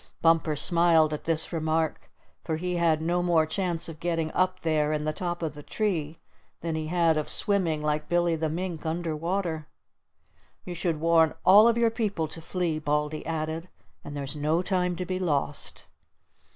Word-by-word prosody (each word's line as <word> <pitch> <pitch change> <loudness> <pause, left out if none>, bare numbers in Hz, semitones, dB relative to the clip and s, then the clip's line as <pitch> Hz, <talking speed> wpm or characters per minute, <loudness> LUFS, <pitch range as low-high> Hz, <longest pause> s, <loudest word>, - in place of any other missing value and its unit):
Bumper 165 -2 +3
smiled 165 0 +4
at 150 - -5
this 160 +1 +1
remark, 160 0 -1 0.3
for 160 - -2
he 180 +1 -2
had 160 -2 +2
no 175 +2 +1
more 170 -3 +3
chance 170 0 -1
of 160 -2 -9
getting 165 -2 -1
up 185 0 0
there 155 -2 +1
in 150 0 -1
the 155 - -1
top 175 0 -3
of 155 -3 -2
the 145 - -10
tree 165 -4 -2 0.4
than 165 -1 -2
he 155 0 -3
had 165 -1 +2
of 155 - -2
swimming 175 -7 +1
like 150 0 -1
Billy 175 -1 +2
the 160 0 -1
Mink 170 0 -4
under 165 0 -2
water. 165 -1 -2 1.0
"You 180 - -5
should 170 -2 -1
warn 165 -1 +3
all 205 +4 +8
of 235 0 +3
your 230 -1 +3
people 205 -8 -1
to 165 - -7
flee," 170 -2 -2
Baldy 150 0 -1
added. 160 +2 -3 0.3
"And 145 0 -7
there's 140 0 -4
no 155 +4 0
time 180 -2 0
to 180 - -4
be 185 +1 -3
lost." 145 -5 -2
165 Hz, 180 wpm, -27 LUFS, 155-175 Hz, 1.0 s, all